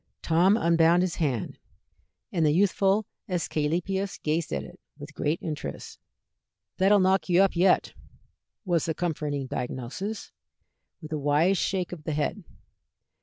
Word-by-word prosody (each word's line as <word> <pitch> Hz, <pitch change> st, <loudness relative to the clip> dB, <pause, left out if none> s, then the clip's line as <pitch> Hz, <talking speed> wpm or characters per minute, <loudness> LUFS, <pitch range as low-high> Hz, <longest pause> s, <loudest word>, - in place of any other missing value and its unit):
Tom 180 Hz, +6 st, +4 dB
unbound 170 Hz, -1 st, +4 dB
his 180 Hz, -2 st, -2 dB
hand, 135 Hz, -, -2 dB, 0.7 s
and 170 Hz, -3 st, 0 dB
the 150 Hz, -, +4 dB
youthful 195 Hz, +4 st, +2 dB, 0.2 s
Æsculapius 180 Hz, +3 st, -1 dB
gazed 155 Hz, +1 st, -1 dB
at -, -, -2 dB
it -, -, -13 dB, 0.2 s
with 145 Hz, 0 st, -10 dB
great 150 Hz, +3 st, -1 dB
interest. 155 Hz, -2 st, -6 dB, 0.8 s
"That'll 195 Hz, +2 st, +5 dB
knock 190 Hz, 0 st, +2 dB
you 175 Hz, 0 st, +4 dB
up 195 Hz, -, +1 dB
yet," 180 Hz, +2 st, +3 dB, 0.7 s
was 175 Hz, -4 st, +1 dB
the 160 Hz, -, -2 dB
comforting 150 Hz, -5 st, -2 dB
diagnosis, 130 Hz, -, -5 dB, 0.7 s
with 155 Hz, -, -9 dB
a 155 Hz, -, -1 dB
wise 150 Hz, +7 st, +2 dB
shake 185 Hz, -2 st, -1 dB
of 160 Hz, -4 st, -9 dB
the 155 Hz, -, -2 dB
head. 155 Hz, +7 st, -2 dB
170 Hz, 135 wpm, -27 LUFS, 150-190 Hz, 0.8 s, That'll